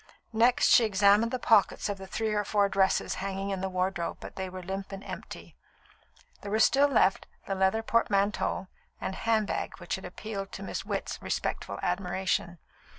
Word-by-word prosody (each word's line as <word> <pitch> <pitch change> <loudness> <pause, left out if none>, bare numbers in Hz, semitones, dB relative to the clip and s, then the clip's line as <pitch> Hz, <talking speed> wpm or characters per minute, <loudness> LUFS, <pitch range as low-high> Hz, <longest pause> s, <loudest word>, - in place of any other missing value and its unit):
Next 235 +3 +4
she 240 - +7
examined 205 +1 +4
the 255 - 0
pockets 220 -5 +3
of 200 -1 -4
the 190 - -8
three 220 +2 -2
or 210 0 +1
four 205 0 +2
dresses 195 -1 +2
hanging 195 0 -3
in 190 -1 -3
the 190 - -1
wardrobe, 185 -1 -2
but - - -10
they 190 -1 -4
were 185 0 -8
limp 195 +2 -5
and 195 0 -7
empty. - - -9 0.9
There 205 - -6
were 215 - +1
still 275 +5 +5
left 225 -8 +2 0.2
the 195 - -2
leather 190 +3 +1
portmanteau 205 -4 +1 0.3
and - - -3
handbag 220 0 -1
which 175 -2 -5
had 190 - -10
appealed 195 +2 -6
to 195 - -6
Miss - - -4
Witt's - - -4
respectful - - -3
admiration. 180 -1 -1
195 Hz, 175 wpm, -29 LUFS, 190-215 Hz, 0.9 s, she